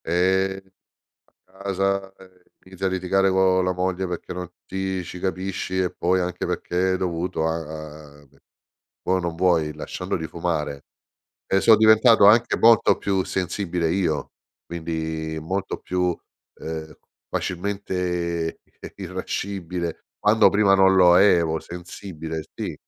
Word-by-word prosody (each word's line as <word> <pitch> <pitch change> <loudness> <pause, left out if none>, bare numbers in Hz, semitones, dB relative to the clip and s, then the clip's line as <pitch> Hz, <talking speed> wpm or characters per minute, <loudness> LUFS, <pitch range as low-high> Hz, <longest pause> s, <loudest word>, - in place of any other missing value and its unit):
Eh! 95 +3 +1 0.8
A 95 +1 -15
casa, 95 0 -1
ehm, 95 -1 -18 0.2
inizia 95 0 -6
a - - +3
litigare 95 +1 +1
co' 95 0 +3
la 90 0 0
moglie 90 +1 -1
perché 90 +1 -5
non 90 0 -5 0.2
ti 95 -1 -3
ci 90 +1 -8
capisci 95 0 -3
e 90 -1 +1
poi 90 +1 +1
anche 90 -1 -3
perché 95 +1 -1
è - - 0
dovuto 85 -2 -2
a 80 - 0 0.7
a - - -20
ve 70 +1 -27 0.6
vuoi 95 - +1
o - - -1
non 85 -2 -3
vuoi, 85 -4 +2
lasciandoli 80 - -4
fumare. 75 -3 -3 0.6
E 95 - +2
so' 110 +2 +7
diventato 110 +1 +6
anche 115 +3 +5
molto 115 0 +5
più 95 -2 0
sensibile 90 -2 -2
io, 85 -5 -1 0.3
quindi 80 -1 -4
molto 95 +5 -3
più, 90 -1 -1 0.4
ehm, 80 -1 -6 0.4
facilmente, 90 -3 -2 0.2
eh - - -9
irascibile, 90 -4 -4
quando 110 +2 +5
prima 100 -1 +3
non 95 0 +5
lo 90 -2 +6
ero, 85 -5 +4
sensibile, 85 -2 -7
sì. - - -4
90 Hz, 135 wpm, -23 LUFS, 85-95 Hz, 0.8 s, so